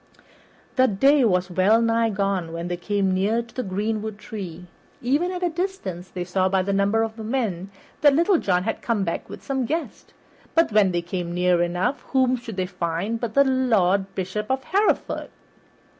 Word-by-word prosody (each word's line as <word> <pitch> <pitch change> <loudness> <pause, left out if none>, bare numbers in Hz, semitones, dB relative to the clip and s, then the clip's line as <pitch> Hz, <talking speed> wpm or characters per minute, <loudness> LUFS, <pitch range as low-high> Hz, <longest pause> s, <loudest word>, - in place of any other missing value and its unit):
The 260 0 +5
day 270 +7 +4
was 180 -3 +1
well 190 +5 +4
nigh 230 0 +2
gone 195 -4 -1
when 170 +1 -4
they 175 - -1
came 195 +1 0
near 210 +5 +1
to 230 - -18
the 255 - -2
greenwood 215 +1 -3
tree. 185 -5 -7 0.3
Even 290 +9 +1
at 365 0 -4
a 350 - +2
distance 315 - -4
they 180 - -4
saw 185 +1 +1
by 190 0 +2
the 200 +1 -1
number 200 +3 +2
of 225 0 -5
men 215 -6 -2 0.3
that 290 -2 +6
Little 340 +3 +3
John 180 -2 +1
had 225 - -3
come 225 -4 0
back 170 -2 -3
with - - -9
some 265 -1 -1
guest, 325 +3 -4 0.4
but 330 -6 +4
when 205 -3 +4
they 175 -1 -1
came 175 0 -4
near 180 -1 +3
enough, 180 +10 0
whom 260 -1 +3
should 235 -4 -8
they 185 - 0
find 180 +5 -3
but 230 -2 -4
the 280 - +7
Lord 200 -8 +2
Bishop 195 +3 -3
of 265 0 0
Hereford! 405 +7 0
210 Hz, 190 wpm, -24 LUFS, 185-255 Hz, 0.4 s, the